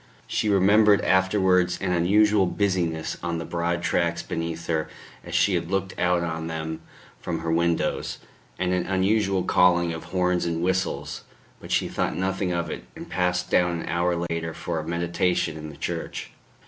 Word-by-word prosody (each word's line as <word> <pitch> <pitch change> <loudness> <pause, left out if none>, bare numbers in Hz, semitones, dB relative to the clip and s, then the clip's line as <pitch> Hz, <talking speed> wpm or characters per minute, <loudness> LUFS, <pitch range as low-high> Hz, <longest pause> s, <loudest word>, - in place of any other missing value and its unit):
She 105 - -1
remembered 100 +1 +5
afterwards 95 -1 +3
an 95 -2 -1
unusual 100 +3 +4
busy 95 -2 +1
ness 80 -1 -4
on 85 -1 -2
the 85 - -4
broad 85 0 -1
tracks 85 -1 0
beneath 85 0 -4
her 80 -2 -1 0.3
as - - -6
she 100 - +3
had 85 -1 -1
looked 95 0 -1
out 90 -1 +2
on 80 -1 -3
them 80 0 -4 0.4
from 85 -2 -3
her 80 0 -2
windows, 85 -2 0 0.4
and 90 0 0
an 90 -1 0
unusual 95 0 +2
calling 85 -2 +3
of 80 0 -7
horns 90 0 0
and 85 0 -1
whistles; 95 +1 -1 0.4
but - - -11
she - - +2
thought - - -2
nothing 95 0 -1
of 85 -1 -1
it, - - -6
and - - -10
passed 90 0 0
down 90 -1 +2
an - - -6
hour 85 +1 +1 0.2
later 80 -1 -3
for 85 -2 -3
a 80 - -6
meditation 85 0 0
in 80 0 -7
the 75 - -11
church. - - -4
85 Hz, 175 wpm, -25 LUFS, 85-95 Hz, 0.4 s, remembered